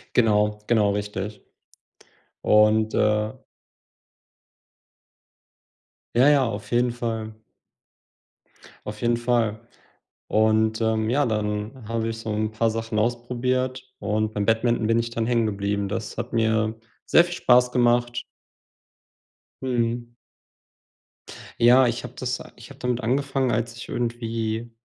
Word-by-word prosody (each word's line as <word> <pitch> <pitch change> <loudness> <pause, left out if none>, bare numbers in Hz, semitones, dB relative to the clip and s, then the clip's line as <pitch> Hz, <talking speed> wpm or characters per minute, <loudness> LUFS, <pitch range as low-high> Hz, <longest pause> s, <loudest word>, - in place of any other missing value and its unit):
Genau, 105 -2 +3
genau 105 -4 +3
richtig, 105 0 -4 1.0
und, 110 +1 +4
äh 105 0 +2 2.8
Ja, 130 +4 +6
ja, 140 -3 +4
auf 105 +1 -7
jeden 120 0 +2
Fall. 110 -2 -4 1.5
Auf 105 0 -7
jeden 120 0 +2
Fall, 115 -3 0 0.7
und, 110 +1 +2
ähm, 110 0 +1
ja, 140 +3 +2
dann 105 +2 -3
habe 115 0 -1
ich 115 - -4
so 115 -1 -6
'n 110 +1 -1
paar 115 +1 +1
Sachen 115 -1 -2
ausprobiert 125 +2 -1 0.2
und 110 +1 -1
beim 105 -1 -1
Badminton 115 0 +1
bin 115 0 +3
ich 115 0 -2
dann 115 -1 -2
hängen 115 -2 +2
geblieben. 100 -1 -1
Das 105 +2 -5
hat 120 0 -5
mir 110 -1 +1 0.3
sehr 170 - +6
viel 175 0 -5
Spaß 125 0 +4
gemacht. 120 0 +2 1.4
Mhm. 120 -1 -1 1.5
Ja, 125 +2 +6
ich 120 0 -2
habe 125 0 -8
das 130 0 -3
a - - -11
ich 120 - -13
habe - - -14
damit 125 0 -1
angefangen, 135 +2 0
als 115 +1 -2
ich 120 - -9
irgendwie 115 -1 -3
115 Hz, 125 wpm, -24 LUFS, 110-120 Hz, 2.8 s, Ja